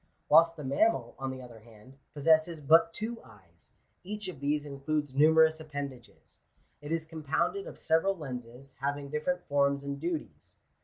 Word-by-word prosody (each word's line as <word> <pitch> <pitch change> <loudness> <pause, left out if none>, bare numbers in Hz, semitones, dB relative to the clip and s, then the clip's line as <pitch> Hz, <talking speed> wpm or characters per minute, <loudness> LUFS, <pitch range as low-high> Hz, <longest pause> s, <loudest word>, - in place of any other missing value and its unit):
Whilst 165 +2 +6
the 150 - -7
mammal, 135 - +1
on 135 0 -3
the 130 -1 -7
other 120 -2 -12
hand, 115 +4 -17 0.2
possesses 160 +2 +3
but 165 +3 +5
two 225 +6 -5
eyes; 95 -7 -18 0.3
each 210 +1 -5
of 160 -7 -9
these 145 +1 0
includes 145 0 -3
numerous 160 +2 +5
appendages. 140 -5 -8 0.4
It 145 +1 -7
is 165 -1 -1
compounded 160 - -2
of - - -9
several 175 +5 +1
lenses, 130 -2 -8
having 140 +1 -3
different 180 +4 -1
forms 140 -1 +2
and 140 0 -4
duties. 165 0 -5
145 Hz, 155 wpm, -30 LUFS, 135-160 Hz, 0.4 s, Whilst